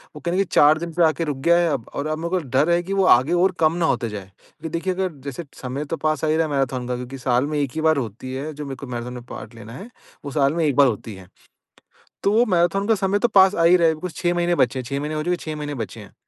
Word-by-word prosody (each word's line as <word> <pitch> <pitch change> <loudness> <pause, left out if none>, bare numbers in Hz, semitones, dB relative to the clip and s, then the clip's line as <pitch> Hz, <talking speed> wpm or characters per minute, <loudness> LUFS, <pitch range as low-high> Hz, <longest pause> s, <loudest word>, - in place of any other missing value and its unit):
वो - - -8
कहीं 170 - -2
न 185 - 0
कहीं 195 - +2
की - - -27
4 150 +2 +6
दिन 170 0 -6
पे 175 - +2
आके 160 +1 +1
रुक 145 -3 -3
गया 170 0 +6
है 175 -1 +2
अब 115 -4 -3
और 140 - -3
अब 155 0 -2
मेरे 170 +1 -3
को 185 +1 0 0.2
डर 150 +5 +3
है 170 0 +3
कि 195 +3 -4
वो 195 -1 +2
आगे 135 +8 -2
और 180 +2 +3
कम 155 0 +3
ना - - +4
होते 120 -7 0
जाए। 105 -2 -7
क्योंकि 160 +2 -10
देखिए 185 +2 -1
अगर 185 0 -2
जैसे 140 +5 -6 0.2
समय 135 +3 -4
तो 165 +3 -4
पास 155 -1 -1
आ - - 0
ही 155 +1 +2
रहा 165 - +2
है - - -7
मैराथन 130 -2 -1
का 125 - -2
क्योंकि 125 +2 -7
साल 125 +1 +1
में 150 0 -2
1 140 -3 -1
ही 160 - -2
बार 160 -1 +3
होती 125 +1 -5
है 140 +4 -4
जो 150 0 -7
मेरे 135 - -6
को 140 +1 -9
मैराथन 120 0 -5
में 125 -1 -8
पार्ट 110 +2 -9
लेना 115 0 -11
है 195 - -9 0.4
वो 140 - -5
साल 140 0 +2
में 165 -2 0
1 145 - +1
बार 140 0 +6
होती 110 -2 -4
है। 95 -1 -13 1.0
तो 200 - +3
वो 230 +3 +4
मैराथन 185 +1 +1
का 225 - +4
समय 195 0 0
तो 240 - +3
पास 195 -2 +5
आ 165 - +1
ही 175 - +7
रहा 170 -1 +3
है 160 - +2
बिकॉज़ 165 +2 -6
6 175 0 0
महीने 175 0 +1
बचे 130 -3 +1
हैं - - -4
6 140 +3 -3
महीने 150 +1 -3
हो 155 - -2
चुके 180 +2 0
6 155 -2 -6
महीने 145 -1 -4
बचे 115 -2 -6
हैं। 100 - -13
155 Hz, 320 wpm, -22 LUFS, 130-175 Hz, 1.0 s, ही